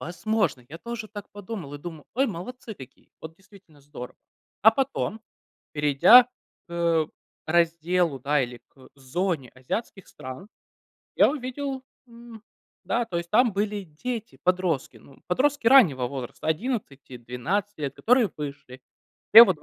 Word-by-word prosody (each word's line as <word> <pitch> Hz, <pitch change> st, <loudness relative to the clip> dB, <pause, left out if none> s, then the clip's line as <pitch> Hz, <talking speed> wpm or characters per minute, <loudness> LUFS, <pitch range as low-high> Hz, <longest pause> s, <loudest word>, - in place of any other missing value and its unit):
Возможно. 180 Hz, -, -1 dB
Я 165 Hz, +3 st, -9 dB
тоже 235 Hz, -1 st, -6 dB
так 205 Hz, -2 st, -9 dB
подумал 195 Hz, -8 st, -7 dB
и -, -, -7 dB
думал: 160 Hz, -1 st, -9 dB
"Ой, 270 Hz, +3 st, +2 dB
молодцы 220 Hz, +4 st, -7 dB
какие. 130 Hz, -6 st, -15 dB
Вот 160 Hz, 0 st, -9 dB
действительно 195 Hz, -6 st, -20 dB
здорово". 140 Hz, -3 st, -10 dB, 0.5 s
А 220 Hz, -, +9 dB
потом, 255 Hz, -3 st, -2 dB, 0.5 s
перейдя 150 Hz, -, +7 dB
к, -, -, -30 dB, 0.4 s
э, 170 Hz, -2 st, +1 dB, 0.4 s
разделу, 170 Hz, -2 st, +1 dB
да, 145 Hz, +1 st, +2 dB
или 120 Hz, -1 st, -6 dB
к 130 Hz, -2 st, -19 dB
зоне 140 Hz, 0 st, -2 dB
азиатских 190 Hz, -, -5 dB
стран, 130 Hz, +10 st, -9 dB, 0.7 s
я -, -, +6 dB
увидел 265 Hz, -1 st, -4 dB, 0.2 s
М, 235 Hz, -2 st, -13 dB, 0.4 s
да, 240 Hz, 0 st, 0 dB
то 175 Hz, -6 st, -4 dB
есть 170 Hz, 0 st, -5 dB
там 240 Hz, +2 st, +4 dB
были 205 Hz, +1 st, -1 dB
дети-подростки, 180 Hz, -, -2 dB
ну, 135 Hz, -, -19 dB
подростки 280 Hz, +7 st, +1 dB
раннего 170 Hz, -, +6 dB
возраста, 130 Hz, -2 st, -7 dB
одиннадцати-двенадцати 160 Hz, -, -3 dB
лет, 140 Hz, -1 st, -3 dB
которые 245 Hz, -2 st, +3 dB
вышли. 140 Hz, -3 st, -7 dB, 0.5 s
Все 230 Hz, -, +12 dB
вот 190 Hz, -8 st, 0 dB
в -, -, -23 dB
180 Hz, 140 wpm, -25 LUFS, 145-225 Hz, 0.7 s, Все